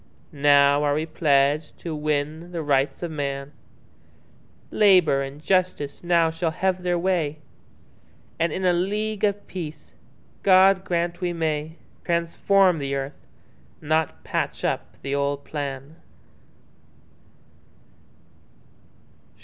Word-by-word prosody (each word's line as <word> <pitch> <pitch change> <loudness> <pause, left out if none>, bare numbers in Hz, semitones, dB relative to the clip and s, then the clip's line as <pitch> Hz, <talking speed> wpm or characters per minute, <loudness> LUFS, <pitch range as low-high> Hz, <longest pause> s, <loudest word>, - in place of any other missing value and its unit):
Now 145 0 +4
are 145 -1 +1
we 155 +1 -1
pledged 150 -1 +1
to 165 - -4
win 150 +3 -2
the 170 -2 -4
Rights 140 +2 0
of 170 - -3
man; 140 -2 -4 1.2
Labour 180 -9 +4
and 135 +1 -6
Justice 180 -4 -1
now 170 -2 +3
shall 165 +1 -1
have 185 +3 -1
their 180 -1 0
way, 170 -4 0 1.0
And 170 -1 +1
in 185 +4 -3
a 180 - +4
League 210 +4 -2
of 205 -1 0
Peace—God 185 +3 0
grant 175 0 -2
we 175 -1 -1
may—Transform 170 +3 0
the 140 -1 -2
earth, 135 +1 -6 0.5
not 155 0 -1
patch - - -3
up - - -3
the 140 +1 -3
old 140 0 -1
plan. 140 +1 -6
160 Hz, 110 wpm, -24 LUFS, 145-180 Hz, 1.2 s, Now